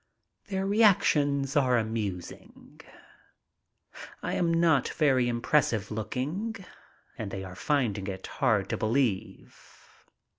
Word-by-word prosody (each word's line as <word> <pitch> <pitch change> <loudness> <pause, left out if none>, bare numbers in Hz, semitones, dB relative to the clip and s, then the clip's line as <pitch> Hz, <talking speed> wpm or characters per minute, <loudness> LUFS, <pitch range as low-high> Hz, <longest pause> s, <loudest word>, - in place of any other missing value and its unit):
Their 190 -1 -2
reactions 150 - +3
are 130 -4 +3
amus 110 -5 -3
ing. - - -16 1.4
I - - -2
am 170 -1 +1
not 165 -5 +3
very 135 -6 +2
impressive 120 -2 +1
looking 145 - -3 0.6
and 110 -3 -4
they 95 0 -5
are 90 -1 -8
finding 110 - -1
it 95 -1 -6
hard - - 0
to - - -1
believe. 110 -3 -2
130 Hz, 110 wpm, -28 LUFS, 110-155 Hz, 1.4 s, reactions